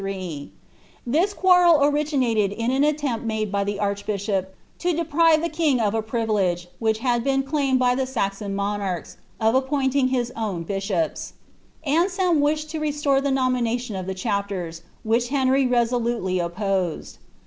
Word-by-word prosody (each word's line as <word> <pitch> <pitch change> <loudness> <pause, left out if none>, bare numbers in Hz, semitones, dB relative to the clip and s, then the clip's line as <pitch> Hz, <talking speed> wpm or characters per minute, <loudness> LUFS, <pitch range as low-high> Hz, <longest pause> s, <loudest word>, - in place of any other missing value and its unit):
Tliia 185 -7 -5 0.8
quarrel 360 -4 +5
originated 275 -8 +1
in 230 +4 -1
an 265 +1 +1
aileropt 290 -5 0
made 220 -2 -2
by 200 -1 0
the 200 0 -3
archbishop, 200 -1 -2 0.2
to 355 0 0
deprive 325 0 +3
the - - +1
king 310 -5 +1
of 210 -2 +1
s 225 -1 -1
privilege, 205 -7 0
which 220 -1 +1
had 240 0 0
been 270 0 +1
claimed 275 -2 +1
by 250 -1 +3
the 260 +1 -1
Saxon 200 -5 -2
monarchs, 200 -3 -3 0.2
of 220 0 +2
appointing 265 0 +1
his 245 -2 -1
owa 200 -7 -3
bishops 195 -4 -2 0.5
Aneelm 350 +2 +2
wished 305 +1 0
to 315 - -3
restore 295 -2 +1
the 280 - 0
nominaiion 250 -2 0
to 190 -3 -4
ihc - - -5
chapten, 200 -4 -2 0.3
which 230 +2 +1
llenry 265 -1 +2
resolutely 235 -6 0
opposed. 180 0 -2
240 Hz, 150 wpm, -23 LUFS, 200-280 Hz, 0.8 s, quarrel